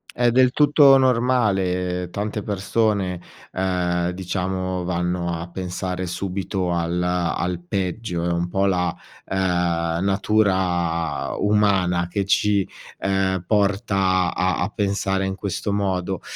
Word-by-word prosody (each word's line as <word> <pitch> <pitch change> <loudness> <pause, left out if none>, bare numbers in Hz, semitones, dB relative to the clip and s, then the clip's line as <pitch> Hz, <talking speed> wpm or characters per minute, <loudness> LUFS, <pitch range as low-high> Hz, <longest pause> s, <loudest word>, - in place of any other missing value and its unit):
È 120 -1 +3
del 130 +1 +4
tutto 145 -1 +6
normale. 95 -9 +1
Tante 105 +3 -3
persone, 100 -2 0 0.3
ehm, 90 -2 0
diciamo 95 0 -3
vanno 90 0 -1
a 85 - -6
pensare 90 0 -4
subito 95 0 -3
al 85 +1 -1
al 90 0 -1
peggio. 95 -1 -2
È 85 - 0
un 85 0 0
po' 95 +2 0
la, 90 -3 +1 0.3
uhm, 85 -3 0
natura 95 -7 0
umana 95 -4 +2
che 100 +3 -2
ci, 100 0 +2 0.3
ehm, 95 -2 0
porta 100 -3 +1
a 90 0 +1
a - - 0
pensare 100 -1 0
in 95 0 -2
questo 100 +1 -3
modo. 95 -2 -1
95 Hz, 115 wpm, -22 LUFS, 90-100 Hz, 0.3 s, tutto